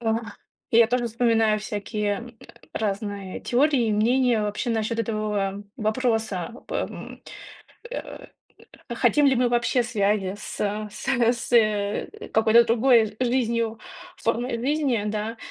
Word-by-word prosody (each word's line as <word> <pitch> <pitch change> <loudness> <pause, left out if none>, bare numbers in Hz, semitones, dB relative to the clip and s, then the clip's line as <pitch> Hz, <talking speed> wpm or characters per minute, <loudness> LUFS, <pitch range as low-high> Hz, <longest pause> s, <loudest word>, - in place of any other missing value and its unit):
А. 225 -1 0 0.5
Я 230 0 +6
тоже 245 0 0
вспоминаю 225 -2 +2
всякие, 210 0 -2
м, 235 -1 -11 0.3
разные 200 -2 -3
теории, 260 -1 +2
и - - +1
мнения 235 +2 +2
вообще 210 +4 -2
насчет 225 0 -1
этого 210 -3 -2
вопроса. 220 -3 -1
По, - - -7
м, - - -5 0.7
э, - - -7 0.7
хотим 295 -1 +3
ли 270 - +4
мы 245 0 +2
вообще 240 +1 +1
связи 205 -4 0
с - - -8 0.3
с 215 - -8
с, 240 -2 +1
э, 210 -3 +2 0.2
какой-то 225 +1 +5
другой 230 -2 +3
жизнью, 235 -3 0 0.4
формой 235 +1 -1
жизни, 270 -3 0
да? 215 +2 -3
225 Hz, 125 wpm, -24 LUFS, 210-240 Hz, 0.7 s, Я